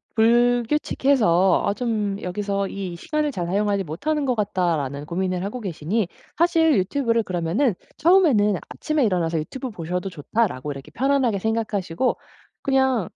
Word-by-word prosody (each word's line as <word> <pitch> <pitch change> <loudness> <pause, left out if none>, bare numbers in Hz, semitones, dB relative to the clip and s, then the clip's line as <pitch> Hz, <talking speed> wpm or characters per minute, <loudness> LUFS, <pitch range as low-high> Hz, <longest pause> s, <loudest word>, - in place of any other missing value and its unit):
불규칙해서 240 - +3
'아 200 - +1
좀 210 -3 -2
여기서 200 +2 -2
이 190 -3 -5
시간을 305 - -1
잘 175 -7 -3
사용하지 200 +1 0
못하는 290 - -2
것 255 -2 +1
같다.'라는 170 -9 -1
고민을 180 +2 -2
하고 210 +6 -4
계시니 190 +1 -2 0.3
사실 325 -2 +4
유튜브를 230 +3 +1
그러면은 185 - 0 0.2
처음에는 300 - +4
'아침에 305 -2 -1
일어나서 170 -5 0
유튜브 255 - -5
보셔도 180 +1 -4
좋다.'라고 150 - -2
이렇게 140 +2 -9
편안하게 260 - +1
생각하시고 220 -1 -1 0.4
그냥 265 -7 +1
205 Hz, 365 characters per minute, -23 LUFS, 180-255 Hz, 0.4 s, 사실